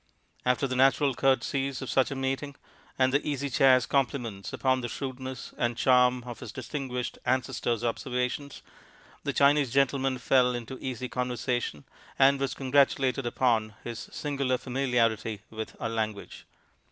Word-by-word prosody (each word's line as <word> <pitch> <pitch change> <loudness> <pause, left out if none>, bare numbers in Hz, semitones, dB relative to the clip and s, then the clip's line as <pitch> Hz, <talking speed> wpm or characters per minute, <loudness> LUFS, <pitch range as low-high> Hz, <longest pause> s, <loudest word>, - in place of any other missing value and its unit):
After 125 +2 +2
the 130 -1 -2
natural 135 +1 +4
courtesies 135 +1 +1
of 130 - -5
such 130 - +3
a 140 - -4
meeting, 135 +2 -2 0.4
and 130 0 +3
the 140 - +2
Easy 140 -2 -2
Chair's 130 0 +5
compliments 125 -7 -1
upon 130 -1 +1
the 120 - -3
shrewdness 130 -2 -6
and 120 -1 0
charm 125 -1 +4
of 120 -1 -8
his - - -7
distinguished 130 -4 -4
ancestor's 125 -2 0
observations, 125 +3 -2 0.6
the - - -1
Chinese 140 -2 +3
gentleman 135 0 +2
fell 125 0 +3
into 120 +2 -6
easy 130 -1 -4
conversation, 125 - -2 0.3
and 135 0 +5
was 135 -1 -1
congratulated 135 -1 +2
upon 115 -4 +1
his 120 -1 -6
singular 140 -3 -1
familiarity 115 -5 0
with 110 0 -6
our 115 - -2
language. 110 -2 -4
130 Hz, 140 wpm, -28 LUFS, 120-135 Hz, 0.6 s, Chair's